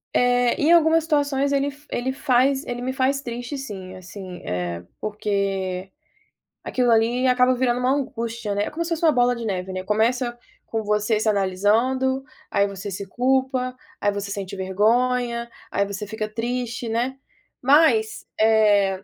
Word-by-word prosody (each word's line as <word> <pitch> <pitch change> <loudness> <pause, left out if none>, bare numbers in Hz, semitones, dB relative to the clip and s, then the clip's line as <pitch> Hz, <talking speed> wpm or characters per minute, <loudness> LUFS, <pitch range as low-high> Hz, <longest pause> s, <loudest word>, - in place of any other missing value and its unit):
Eh, 245 -1 +3
em 310 +3 +3
algumas 325 -1 +5
situações 285 -3 +1
ele 280 0 +1 0.2
ele 255 +2 -1
faz 265 +1 +2
ele 245 0 -4
me 260 +1 -2
faz 270 +1 +1
triste 245 +2 -5
sim, 190 -8 -7
assim, 185 -1 -9
eh, 90 -1 -3 0.2
porque 195 -3 -2 0.7
aquilo 245 -2 +1
ali 230 +3 +3
acaba 250 0 +4
virando 245 -1 +1
uma 250 +1 +2
angústia, 235 -6 -2
né? 205 +1 -1
Como 335 +2 -3
se - - -4
fosse 335 0 -2
uma 315 - +6
bola 245 -2 +3
de 235 - -6
neve, 190 -2 -3
né? 185 0 -4
Começa 240 +4 +1 0.3
com 225 -1 -2
você 210 +1 +1
se 220 - -1
analisando, 220 +7 +1 0.3
aí 200 0 +3
você 200 0 -6
se 195 +2 -5
culpa, 255 +2 0 0.2
aí 205 - +2
você 200 0 -4
sente 200 -2 -5
vergonha, 235 +5 +1 0.2
aí 200 - +1
você 200 +1 -5
fica 215 +1 -4
triste, 235 +1 -3
né? 245 +4 -1 0.4
Mas, 325 - +3
eh, 205 -3 +4
235 Hz, 160 wpm, -23 LUFS, 200-260 Hz, 0.7 s, uma